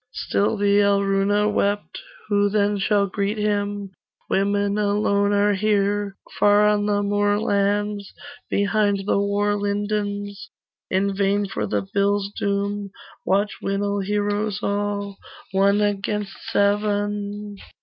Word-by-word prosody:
Still 205 Hz, +2 st, 0 dB
the 200 Hz, 0 st, +3 dB
Alruna 200 Hz, 0 st, +2 dB
wept 205 Hz, -1 st, -1 dB, 0.3 s
'Who 205 Hz, -1 st, +2 dB
then 205 Hz, 0 st, +1 dB
shall 200 Hz, +1 st, +2 dB
greet 200 Hz, +2 st, -2 dB
him? 205 Hz, -1 st, -1 dB, 0.4 s
Women 200 Hz, +1 st, +1 dB
alone 200 Hz, 0 st, +1 dB
are 205 Hz, 0 st, +3 dB
here: 205 Hz, 0 st, 0 dB, 0.2 s
Far 205 Hz, 0 st, +5 dB
on 210 Hz, 0 st, +2 dB
the 205 Hz, 0 st, +1 dB
moorlands 205 Hz, 0 st, 0 dB, 0.4 s
Behind 205 Hz, -1 st, +1 dB
the 200 Hz, -, +2 dB
war 205 Hz, +1 st, +1 dB
lindens, 205 Hz, -1 st, -3 dB, 0.4 s
In 195 Hz, +1 st, 0 dB
vain 200 Hz, +1 st, +1 dB
for 195 Hz, -, -3 dB
the 200 Hz, -, -1 dB
bill's 200 Hz, 0 st, +1 dB
doom 200 Hz, 0 st, -2 dB, 0.4 s
Watch 200 Hz, +2 st, +1 dB
Winil 200 Hz, 0 st, -1 dB
heroes 205 Hz, +1 st, -1 dB
all, 200 Hz, -1 st, -2 dB, 0.3 s
One 200 Hz, +2 st, +3 dB
against 205 Hz, 0 st, -1 dB, 0.2 s
seven. 205 Hz, 0 st, -1 dB
205 Hz, 115 wpm, -23 LUFS, 200-205 Hz, 0.4 s, Far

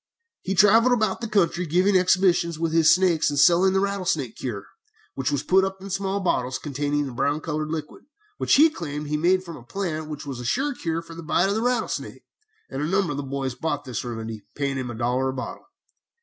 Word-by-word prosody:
He 195 Hz, -, -2 dB
travelled 225 Hz, +6 st, +6 dB
about 215 Hz, -4 st, 0 dB
the 230 Hz, -, -3 dB
country 180 Hz, -4 st, +1 dB
giving 185 Hz, +5 st, +2 dB
exhibitions 180 Hz, -2 st, +3 dB
with 165 Hz, 0 st, -1 dB
his 165 Hz, -1 st, +5 dB
snakes, 180 Hz, -4 st, +3 dB
and 145 Hz, -, -3 dB
selling 175 Hz, +6 st, +5 dB
the 190 Hz, -, +3 dB
rattlesnake 185 Hz, -, -1 dB
cure, 105 Hz, -6 st, -5 dB, 0.5 s
which 135 Hz, -, -2 dB
was 145 Hz, -1 st, -1 dB
put 190 Hz, +5 st, +4 dB
up 190 Hz, 0 st, -3 dB
in 195 Hz, +1 st, -8 dB
small 195 Hz, +1 st, -1 dB
bottles 130 Hz, -9 st, 0 dB
containing 145 Hz, 0 st, -2 dB
a -, -, -6 dB
brown 145 Hz, +5 st, 0 dB
colored 155 Hz, -1 st, -3 dB
liquid, 155 Hz, -1 st, -6 dB, 0.3 s
which -, -, +3 dB
he 310 Hz, +3 st, +6 dB
claimed 150 Hz, -, -5 dB
he 150 Hz, -, 0 dB
made 180 Hz, +4 st, +2 dB
from 170 Hz, -3 st, -9 dB
a -, -, -12 dB
plant 155 Hz, +1 st, -4 dB
which 150 Hz, -1 st, -6 dB
was 135 Hz, -3 st, -6 dB
a -, -, -6 dB
sure 275 Hz, -, 0 dB
cure 165 Hz, -7 st, -3 dB
for 165 Hz, -, -11 dB
the 165 Hz, -, -8 dB
bite 165 Hz, +4 st, +1 dB
of -, -, +1 dB
the 220 Hz, -, -1 dB
rattlesnake, 245 Hz, -1 st, -2 dB, 0.4 s
and 135 Hz, -, -5 dB
a 150 Hz, -, -1 dB
number 190 Hz, -1 st, +1 dB
of 145 Hz, -, -4 dB
the -, -, -2 dB
boys 135 Hz, -1 st, -3 dB
bought 145 Hz, +2 st, -3 dB
this 125 Hz, -4 st, -4 dB
remedy, 115 Hz, -3 st, -6 dB
paying 140 Hz, -2 st, -2 dB
him 130 Hz, -2 st, -4 dB
a 120 Hz, -, -6 dB
dollar 125 Hz, +3 st, 0 dB
a -, -, -3 dB
bottle. 125 Hz, -2 st, -7 dB
160 Hz, 225 wpm, -24 LUFS, 140-190 Hz, 0.5 s, travelled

